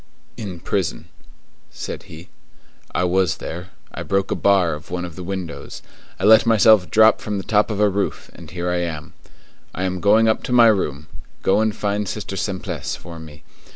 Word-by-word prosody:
"In 100 -7 -7
prison," 95 -1 -2 0.6
said - - -7
he. 80 +3 -11 0.6
"I - - 0
was 90 -2 +2
there; 90 +3 -7 0.2
I - - -6
broke 95 0 -1
a - - +1
bar 95 -5 +3
of 75 0 -9
one 90 0 -3
of 85 -3 -9
the 90 - -8
windows; 95 -2 -6 0.4
I - - -5
let 110 +3 +6
myself 110 -4 +5
drop 110 0 +5
from 105 -1 -3
the 95 - -4
top 105 +2 +2
of 105 -2 -3
a 105 - +5
roof, 100 0 -3
and - - -12
here 90 0 -3
I 90 - 0
am. 80 -3 -5 0.6
I 90 - -3
am 90 -1 -2
going 110 +2 +5
up 110 - +2
to - - -5
my 120 -2 +7
room; 75 -8 -1 0.4
go 95 - +3
and 110 -1 0
find 105 -2 -2
Sister 100 -1 -5
Simplice 95 0 -3
for 85 0 -10
me. 80 -1 -12
95 Hz, 190 wpm, -21 LUFS, 90-105 Hz, 0.6 s, my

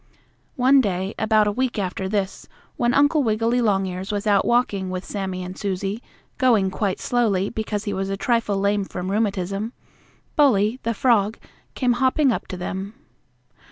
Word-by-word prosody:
One 265 +2 +5
day, 190 -2 -2
about 215 -1 +3
a 210 - +1
week 255 +2 -1
after 190 -1 -2
this, 195 -2 -2 0.3
when 240 0 +1
Uncle 290 +3 +4
Wiggily 230 +1 +1
Longears 195 -3 0
was 205 0 -2
out 200 -2 +3
walking 205 -6 +1
with 185 0 -4
Sammie 190 -3 -4
and 180 +1 -7
Susie, 200 +2 -3 0.4
going 225 -7 +3
quite 195 -1 -1
slowly, 210 -6 +1
because 215 -2 -3
he 205 - -3
was 195 0 -2
a 195 - -2
trifle 230 -2 0
lame 200 +1 +1
from 185 -1 -5
rheumatism, 200 +1 -1 0.6
Bully, 240 -5 +3
the 230 0 -2
frog, 220 -3 +2 0.4
came 250 -2 +2
hopping 260 +3 +2
up - - -3
to 185 - -6
them. 190 +4 -5
205 Hz, 160 wpm, -23 LUFS, 195-235 Hz, 0.6 s, One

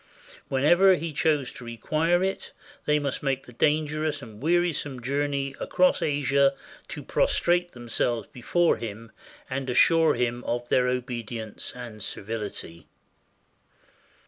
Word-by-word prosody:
Whenever 175 +8 +5
he 165 -2 -4
chose 145 -3 +1
to - - -11
require 155 +9 0
it, 190 0 -3 0.3
they 150 0 +3
must 140 -2 -2
make 135 -1 -1
the 125 - -13
dangerous 155 +3 0
and 110 -1 -12
wearisome 160 -4 +1
journey 140 +2 -1
across 185 0 +2
Asia 140 -1 +2 0.3
to - - -7
prostrate 175 0 +1
themselves 120 -1 -2
before 170 +8 +2
him 115 0 -7 0.4
and 130 0 -3
assure 165 +6 +5
him 120 0 -1
of 120 0 -2
their 125 -1 +3
obe 125 -1 -1
dience 115 -2 -5
and 120 -4 -8
servility. 100 -6 -6
135 Hz, 125 wpm, -26 LUFS, 120-155 Hz, 0.4 s, Whenever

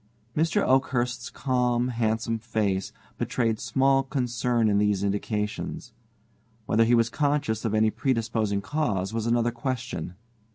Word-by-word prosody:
Mr. 165 +6 +2
Oakhurst's 125 -2 +1
calm, 125 -2 0
handsome 115 -1 -1
face 105 -4 -1 0.3
betrayed 115 -3 0
small 135 +4 +2
concern 125 -3 0
in 100 -1 +3
these 105 -2 +1
indications. 105 +1 -3 0.7
Whether 115 +2 +3
he 120 +1 +4
was 115 -1 +2
conscious 140 -4 0
of 110 -1 0
any 110 0 +3
predisposing 110 -4 0
cause 110 -9 -1
was 115 0 -1
another 120 0 +2
question. 120 -8 -4
115 Hz, 125 wpm, -26 LUFS, 110-125 Hz, 0.7 s, he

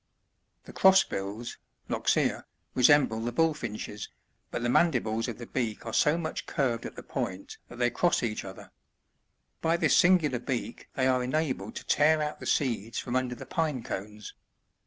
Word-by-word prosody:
The - - -12
Crossbills, 120 - +2
— - - -44
Loxia^ - - +1
— - - -47
resemble 130 -3 +4
the 120 +2 -2
Bullfinches, 120 -8 -2 0.4
but 120 - -4
the - - +1
mandibles 120 -6 +2
of 120 - -5
the 120 - -8
beak 115 -3 -3
are 115 - -5
so 150 +2 +3
much 160 -2 -4
curved 125 -7 -1
at - - -11
the - - -9
point 95 +1 -5
that - - -10
they 120 0 +2
cross 175 +5 +1
each 110 -3 -2
other. 95 -1 -10 0.9
By 165 +1 +2
this 165 -2 +3
singular 165 -8 +4
beak 120 -2 -4
they 130 - +1
are 130 -1 +3
enabled 130 -6 -2
to - - -6
tear 155 +1 +4
out 150 0 -3
the - - -7
seeds 115 -5 0
from 120 - -3
under 130 -1 0
the 135 - -9
pine 150 -3 -1
cones. 105 +1 -6
125 Hz, 175 wpm, -28 LUFS, 115-150 Hz, 0.9 s, resemble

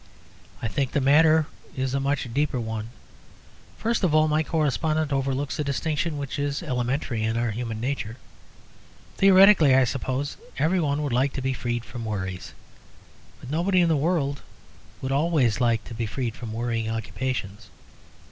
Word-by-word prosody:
I - - 0
think 130 +4 -2
the - - +2
matter 155 +3 +5 0.3
is 130 0 -1
a 140 - +1
much 140 -1 -1
deeper 140 -2 0
one. 110 -1 -4 0.9
First 230 -1 -1
of 165 -4 +3
all, 155 0 +5
my 155 +1 +2
correspondent 155 0 0
overlooks 135 +2 -1
a - - +1
distinction 150 +2 -1
which 140 0 -4
is 145 0 -2
elementary 125 -1 -1
in 110 +1 0
our 120 -1 0
human 115 0 -4
nature. 120 -2 -3 1.0
Theoretically, 195 -7 +7
I 135 - +6
suppose, 135 +2 -2 0.2
every 160 +6 +2
one 150 -2 0
would 140 -4 -2
like 130 +3 +2
to 135 - -4
be 135 0 0
freed 120 -1 -3
from 120 -1 -7
worries. 95 -4 -5 0.9
But 130 - -8
nobody 180 +4 +2
in 170 -1 +4
the 160 - +3
world 145 -2 0 0.6
would 130 - -2
always 140 -6 +2
like 115 -2 +2
to 115 - -10
be 115 0 -3
freed 120 +1 -3
from 115 -3 -7
worrying 115 -1 -2
occupations. 110 -2 -4
135 Hz, 165 wpm, -25 LUFS, 120-150 Hz, 1.0 s, Theoretically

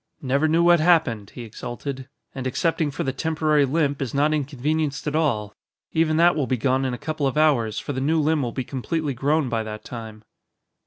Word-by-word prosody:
"Never 140 +4 +2
knew 165 +2 +3
what 175 -1 +6
happened," 155 - +2
he 120 - -6
exulted, 130 +4 -7 0.2
"and 130 -1 -4
excepting 160 +3 0
for 140 - -4
the 135 - -2
temporary 155 0 +1
limp 140 0 0
is 135 -1 -3
not 150 +2 +3
inconvenienced 145 0 -1
at 150 0 -2
all. 110 -10 0 0.4
Even 160 -1 +2
that 170 +1 +5
will 145 -4 0
be 130 - 0
gone 130 +3 +1
in 130 - -1
a - - -8
couple 155 +1 -2
of 135 - -2
hours, 130 -9 +2
for 145 - -4
the 130 - -3
new 160 +4 +2
limb 155 0 +2
will 120 -3 -2
be 130 - -3
completely 145 +3 -3
grown 145 +3 +1
by 115 -2 -1
that 110 -1 -7
time." 110 -3 -8
140 Hz, 210 wpm, -23 LUFS, 125-155 Hz, 0.4 s, what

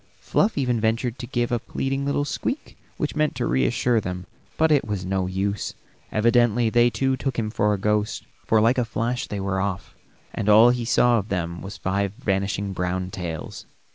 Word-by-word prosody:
Fluff 210 -2 +1
even 125 -5 +1
ventured 115 +3 0
to 120 - -6
give 120 0 -1
a 120 - +1
pleading 135 +4 -3
little 145 0 0
squeak 265 - -4 0.2
which - - -2
meant 155 0 +1
to - - -1
reassure 65 - +2
them, 90 -1 -5 0.3
but 160 0 +3
it 145 -3 +4
was 105 -4 -3
no 95 0 -1
use; 100 +2 -2 0.4
evidently 120 0 +3
they 120 +1 +5
too 135 +2 0
took 135 0 -3
him 110 -2 -1
for 105 -1 +1
a 105 - +1
ghost, 105 +1 0 0.2
for 110 - +3
like 115 +4 +3
a - - +3
flash 115 +2 -2
they 105 - -4
were 95 -1 -1
off, 95 -1 -3 0.4
and 105 - -1
all 110 +3 +8
he 120 -1 -2
saw 120 0 +4
of 105 - -6
them 85 -2 -3
was 100 +1 -7
five 100 +1 -1
vanishing 100 -3 -1
brown 90 0 -2
tails. 85 -4 -6
110 Hz, 195 wpm, -24 LUFS, 95-120 Hz, 0.4 s, all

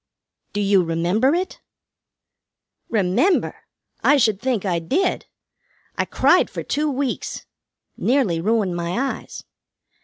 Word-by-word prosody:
"Do 205 - -1
you 200 -1 +4
remember 175 - +1
it?" 370 +2 -3 1.3
"Remember! 215 - +1 0.4
I 290 - +5
should 220 -6 +2
think 245 -6 -1
I 175 -3 0
did. 315 - -1 0.7
I - - 0
cried - - +3
for - - -6
two 300 +1 -1
weeks. 270 -2 -3 0.5
Nearly 235 -11 +1
ruined 205 -2 +1
my 170 +1 -3
eyes. 270 0 -4
215 Hz, 115 wpm, -21 LUFS, 180-275 Hz, 1.3 s, I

